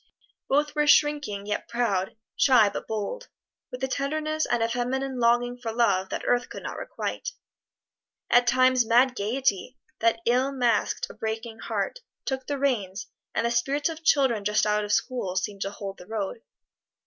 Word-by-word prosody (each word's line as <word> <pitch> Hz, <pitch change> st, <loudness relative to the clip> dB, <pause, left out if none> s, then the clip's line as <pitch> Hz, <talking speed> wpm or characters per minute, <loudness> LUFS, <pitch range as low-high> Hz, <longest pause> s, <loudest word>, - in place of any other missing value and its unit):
Both 295 Hz, +2 st, +2 dB
were 300 Hz, -1 st, +1 dB
shrinking 290 Hz, -10 st, +3 dB
yet 210 Hz, 0 st, -3 dB
proud, 220 Hz, -5 st, -1 dB, 0.2 s
shy 245 Hz, -6 st, +5 dB
but -, -, -6 dB
bold, 220 Hz, -, -4 dB, 0.4 s
with 250 Hz, +1 st, -7 dB
a -, -, +2 dB
tenderness 310 Hz, +3 st, -1 dB
and 240 Hz, -1 st, +1 dB
a -, -, +2 dB
feminine 255 Hz, +2 st, -2 dB
longing 240 Hz, +1 st, +2 dB
for 230 Hz, -2 st, -4 dB
love 220 Hz, -5 st, +2 dB
that -, -, -4 dB
earth 245 Hz, 0 st, +1 dB
could -, -, -8 dB
not -, -, -5 dB
requite. -, -, -4 dB, 1.0 s
At 245 Hz, 0 st, +4 dB
times 255 Hz, 0 st, +4 dB
mad 245 Hz, +3 st, +4 dB
gaiety, 240 Hz, +2 st, -1 dB, 0.2 s
that 230 Hz, 0 st, +2 dB
ill 255 Hz, +3 st, +2 dB
masked 240 Hz, -5 st, +1 dB
a -, -, -13 dB
breaking 225 Hz, +1 st, -5 dB
heart, -, -, -3 dB, 0.3 s
took 265 Hz, -1 st, -3 dB
the 285 Hz, -, -1 dB
reins, 220 Hz, -9 st, -1 dB, 0.3 s
and -, -, +1 dB
the 235 Hz, -, +1 dB
spirits 275 Hz, +6 st, +1 dB
of 325 Hz, 0 st, -7 dB
children 265 Hz, -9 st, +3 dB
just 210 Hz, +1 st, +2 dB
out 210 Hz, 0 st, +1 dB
of 205 Hz, -, -4 dB
school 210 Hz, -4 st, 0 dB
seemed 195 Hz, +1 st, -2 dB
to 195 Hz, -, -1 dB
hold 200 Hz, -1 st, -7 dB
the 180 Hz, -, -12 dB
road. 215 Hz, 0 st, -4 dB
240 Hz, 170 wpm, -26 LUFS, 210-270 Hz, 1.0 s, shy